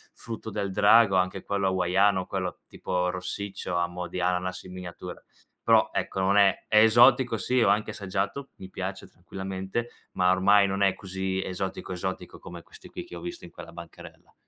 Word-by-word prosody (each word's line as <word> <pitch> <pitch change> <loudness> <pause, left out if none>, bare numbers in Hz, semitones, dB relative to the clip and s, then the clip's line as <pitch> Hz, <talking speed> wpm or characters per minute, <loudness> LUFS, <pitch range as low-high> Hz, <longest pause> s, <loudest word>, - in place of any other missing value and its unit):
frutto 115 -1 -7
del 100 -2 -3
drago, 105 0 +5
anche 95 +1 0
quello 100 -1 -1
hawaiano, 95 +1 +2
quello 90 -2 -4
tipo 90 0 -2
rossiccio 95 0 -5
a 85 0 +2
mo' 90 +1 -6
di 90 - -5
ananas 90 +1 -1
in 90 0 -11
miniatura. 90 0 -8 0.4
Però - - +4
ecco, 95 - -2
non 100 +2 +3
è 100 -2 +3
è 110 - +5
esotico 120 +1 +5
sì, 125 +6 +1
ho - - +4
anche 105 +1 +1
assaggiato, 100 +7 -3
mi 95 - -11
piace, 95 +1 -5
tranquillamente, 95 +5 -5 0.2
ma 90 0 +3
ormai 100 +2 +5
non 100 +1 -2
è 95 -1 +3
così 95 -1 -3
esotico, 95 0 -5
esotico 95 +1 -5
come 85 -1 -10
questi - - -15
qui - - -7
che 90 - -11
ho 85 - -8
visto 85 0 -7
in - - -13
quella - - -11
bancarella. 85 0 -13
95 Hz, 180 wpm, -27 LUFS, 90-100 Hz, 0.4 s, drago